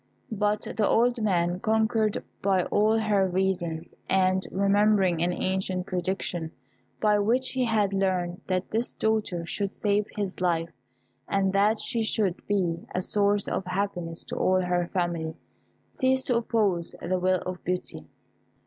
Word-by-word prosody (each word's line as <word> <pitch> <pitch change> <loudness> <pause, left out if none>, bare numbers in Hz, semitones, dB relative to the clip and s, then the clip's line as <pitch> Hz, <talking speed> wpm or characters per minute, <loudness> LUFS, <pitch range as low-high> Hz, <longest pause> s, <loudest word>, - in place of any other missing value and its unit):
But 210 0 0
the 215 - +2
old 240 +1 +2
man, 175 -4 +1
conquered 220 0 +1 0.2
by 190 -2 +2
all 215 +4 +2
her 210 -3 +2
reasons, 175 -3 -1 0.2
and 185 0 +3
remembering 195 -3 +3
an 175 +1 +2
ancient 185 0 -2
prediction, 180 -2 -2 0.5
by 210 -1 +3
which 245 +5 +1
he 260 -1 0
had 210 -4 +1
learnt 185 -2 -1
that 185 0 -1
this 230 +3 -1
daughter 215 -6 -1
should 200 +3 -2
save 205 0 0
his 200 -3 -4
life, 170 -2 0 0.5
and 195 -1 +1
that 205 +3 +3
she 230 +1 -1
should 210 -4 0
be 175 -5 0
a 180 - +1
source 205 0 +2
of - - -1
happiness 180 -3 -3
to - - -6
all 185 0 +2
her 180 -1 0
family, 170 -3 -2 0.6
ceased 260 0 +1
to 245 - +2
oppose 210 -7 0
the 185 +2 -1
will 185 0 +1
of 185 -1 -5
Beauty. 180 0 -4
195 Hz, 150 wpm, -27 LUFS, 180-210 Hz, 0.6 s, and